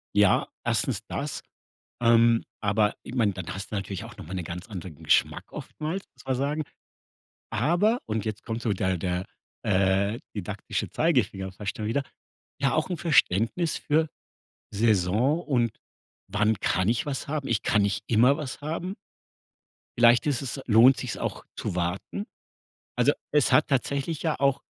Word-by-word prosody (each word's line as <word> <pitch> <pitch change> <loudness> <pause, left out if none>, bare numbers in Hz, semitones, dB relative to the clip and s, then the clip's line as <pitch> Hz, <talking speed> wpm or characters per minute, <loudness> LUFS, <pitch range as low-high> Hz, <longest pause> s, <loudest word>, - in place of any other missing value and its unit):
Ja, 105 -2 +4 0.2
erstens - - 0
das, - - -4 0.6
ähm, 115 0 +5 0.2
aber 105 0 +2
ich - - -9
meine, 110 -6 +2
dann 90 -3 -6
hast 95 +1 -7
du - - -2
natürlich 95 -2 -4
auch - - -12
noch - - -9
mal 85 - -8
'ne 90 -2 -3
ganz 90 +5 -6
anderen 90 -6 -8
Geschmack - - +2
oftmals, 160 +5 -5
muss - - -17
man 130 -1 0
sagen, 145 +4 -1 0.9
aber- 175 - +2
und 110 -2 -2
jetzt 110 -1 -4
kommt 115 0 -4
so 115 - 0
der 95 -1 0
der, 90 +1 -2 0.4
äh, 95 +4 +2
didaktische 100 0 -4
Zeigefinger 100 - +1
fast 100 +2 -5
schon 105 -1 -3
wieder- 135 +5 0 0.6
ja, 135 - +2
auch 155 - 0
'n 180 - -1
Verständnis 155 - +2
für 155 +1 +1 0.6
Saison 110 - +2
und 120 -6 0 0.5
wann 105 +2 +2
kann 95 +1 +1
ich 115 +5 +1
was 140 -2 -3
haben. 145 -2 -2
Ich - - +1
kann 105 -2 +3
nicht 100 +1 -1
immer 120 +5 +5
was 145 -3 -6
haben. 165 +5 -3 1.0
Vielleicht 120 0 +6
ist 145 -4 0
es 135 0 -4
lohnt 120 +4 +7
sich's 125 -3 -4
auch - - -4
zu - - -4
warten. 90 - -2 0.7
Also - - +5 0.2
es 150 -3 +3
hat 155 - +5
tatsächlich 140 +3 -1
ja 160 -2 0
auch 140 -1 +2
115 Hz, 160 wpm, -27 LUFS, 100-140 Hz, 1.0 s, lohnt